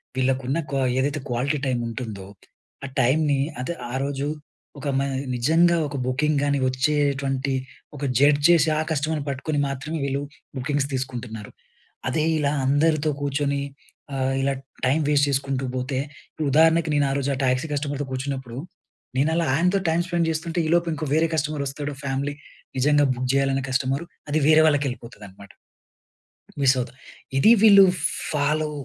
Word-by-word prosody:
వీళ్ళకున్న 130 +2 0
క్వా 135 -1 0 0.2
ఏదైతే 145 +2 0
quality 130 +5 0
time 125 -3 0
ఉంటుందో, 110 -5 -6 0.6
ఆ - - -4
టైమ్‌ని 140 +3 +2 0.2
అదె, 170 +7 -3 0.2
ఆ - - -6
రోజు 140 0 -2 0.5
ఒక 145 - -5
మై 140 - 0 0.3
నిజంగా 165 +7 +3
ఒక 145 - -7
బుకింగ్ 145 +3 +1
గాని 140 -1 +1
వచ్చేటువంటి, 135 0 0 0.4
ఒక 145 - -7 0.2
జడ్జ్ 145 +1 +4
చేసి, 165 -2 +5
ఆ - - +2
కస్టమర్‌ని 155 -1 -1
పట్టుకొని 145 +2 -2
మాత్రమే 140 +4 -4
వీళ్ళు 140 +1 -1 0.4
బుకింగ్స్ 140 +1 -1
తీసుకుంటున్నారు. 120 -5 -5 0.6
అదే 155 +4 0 0.2
ఇలా 145 -1 +1
అందరితో, 155 +1 +2
కూర్చొని 140 0 0 0.5
ఆహ్, 135 0 0
ఇలా 135 +1 +1 0.3
టైమ్ 145 +5 +2
వేస్ట్ 145 -1 +4
చేసుకుంటూ 135 -1 -1
పోతే, 130 +1 -2 0.5
ఉదాహరణకి, 160 +2 +4
నేను 145 -1 +3
ఆరోజు 140 0 -1
ఆ - - -6
టాక్సీ 130 +5 +1
కస్టమర్‌తో 145 -1 -2
కూర్చున్నప్పుడు, 130 -2 -4 0.6
నేను 145 +4 +3
అలా 170 0 +1
ఆయనతో 180 +5 +2
టైమ్ 165 +2 +2
స్పెండ్ 170 -2 0
చేస్తుంటే, 165 +2 -3
ఈలోపు 170 +1 +2
ఇంకో 155 +1 -4
వేరే 160 +1 +3
కస్టమర్ 150 -1 -1
వస్తాడు 145 +1 -4
ఫ్యామిలీ. 140 +1 -2 0.4
నిజంగా 145 +3 +4
బుక్ 125 +1 -3
చేయాలనే 135 0 +1
కస్టమరు. 135 +4 0 0.2
అది 150 +2 +2
వేరే 160 0 +7
వాళ్ళకి 145 -1 +2
ఎళ్ళిపోతదనమాట. 100 -6 -11 1.1
మిస్ 135 0 +5
అవుతునయి. 125 +2 -5 0.4
ఇది 175 - +6
వీళ్ళు 200 -2 +9 0.5
ఫాలో 150 +1 0
140 Hz, 145 wpm, -24 LUFS, 130-155 Hz, 1.1 s, వీళ్ళు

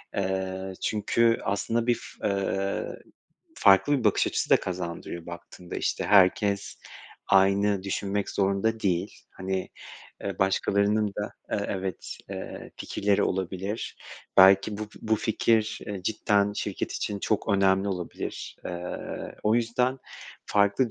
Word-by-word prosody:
eee, 95 0 -2
çünkü 115 +2 +2
aslında 115 +4 -1
bir 120 - +4 0.3
f - - +1
eee, 100 0 -1 0.6
farklı 100 +9 +5
bir 120 - -5
bakış 105 - +3
açısı - - -1
da - - +8
kazandırıyor 85 -1 -5
baktığında. 85 +1 -8
İşte, - - -1
herkes 100 0 +3 0.5
aynı 100 +1 +3
düşünmek 100 +1 -2
zorunda 100 +3 +1
değil. 95 0 0 0.2
Hani, 95 0 -3 0.6
eee, 100 -1 -3
başkalarının 100 +2 +2
da, 105 - -3 0.2
eee, 100 - 0
evet, 95 -2 -4
eee, - - -7
fikirleri 100 0 0
olabilir, 95 +3 -2 0.4
belki 95 +2 +6
bu 110 -1 -5
bu 110 0 +2
fikir 110 0 +1 0.2
cidden 105 0 +1
şirket - - -3
için 105 - -3
çok 105 +1 -1
önemli 95 0 +3
olabilir. 90 -3 -5
Eee, 90 0 -5
o 105 +1 +3
yüzden 125 +3 +1 0.5
farklı 105 +4 +2
100 Hz, 120 wpm, -27 LUFS, 95-105 Hz, 0.6 s, da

